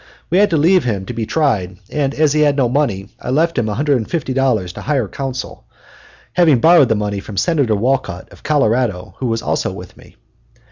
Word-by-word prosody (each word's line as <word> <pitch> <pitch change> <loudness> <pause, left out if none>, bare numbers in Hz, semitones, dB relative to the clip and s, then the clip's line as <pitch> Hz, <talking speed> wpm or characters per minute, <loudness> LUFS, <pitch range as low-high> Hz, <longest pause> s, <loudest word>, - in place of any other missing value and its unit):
We 180 - +4
had 205 - +4
to 165 - +1
leave 175 +5 +4
him 100 -6 -2
to 125 - -6
be 115 -2 -3
tried, 100 - 0
and 145 -2 -1
as 150 -2 +2
he 155 - +2
had 145 -2 +3
no 130 -3 +3
money 120 -7 -1
I - - -6
left 160 +6 +1
him 115 -4 0
$150 130 - 0
to - - -8
hire 135 -6 -1
counsel 130 +3 -6 0.7
having 160 -8 +4
borrowed 165 -2 +5
the 110 - +2
money 105 -1 -2
from 100 0 -9
Senator 140 - +1
Wolcott, 120 -5 -2
of - - -17
Colorado, 115 - 0
who 130 - -2
was 115 -1 -2
also - - -1
with 90 -1 -10
me. - - -18
130 Hz, 195 wpm, -17 LUFS, 105-150 Hz, 0.7 s, borrowed